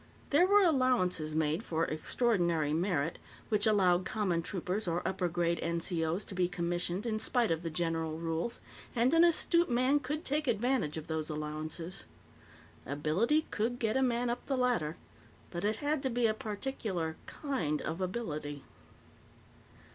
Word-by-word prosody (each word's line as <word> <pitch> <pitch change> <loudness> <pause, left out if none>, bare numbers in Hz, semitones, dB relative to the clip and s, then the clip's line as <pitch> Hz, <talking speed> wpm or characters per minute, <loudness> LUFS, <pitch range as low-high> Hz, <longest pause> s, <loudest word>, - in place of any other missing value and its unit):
There 325 +6 +5
were 405 +1 +6
allowances 245 - +2
made 160 +3 +1
for 165 -6 -1
"extraordinary 170 -4 +1
merit," 165 -2 0 0.3
which 210 -1 +2
allowed 185 -4 +4
common 185 -4 0
troopers 185 +3 -3
or 170 +1 -1
upper 185 -1 0
grade 170 0 0
NCO's 170 +1 0
to - - -8
be 180 -1 +2
commissioned 175 +2 -2
in 215 -2 -1
spite 230 -2 +1
of 165 0 0
the 170 - -3
general 165 -1 -1
rules, 165 +7 -2 0.4
and 240 +4 +3
an 330 +1 +7
astute 340 0 +3
man 255 +4 +3
could 295 +3 -4
take 295 +1 0
advantage 235 - +1
of 155 - -5
those 160 0 -3
allowances. 155 +4 -5 0.8
Ability 160 - +1
could 230 +3 -1
get 225 -1 0
a 265 - +3
man 245 -1 +1
up 245 - -4
the 270 - 0
ladder, 235 -12 +1 0.5
but 175 +1 -4
it 210 +2 +1
had 290 +4 -1
to 265 - 0
be 240 -1 +1
a 220 - +3
particular 205 -7 -3
kind 180 - -2
of 165 +4 -3
ability. 155 - -3
185 Hz, 155 wpm, -32 LUFS, 165-245 Hz, 0.8 s, an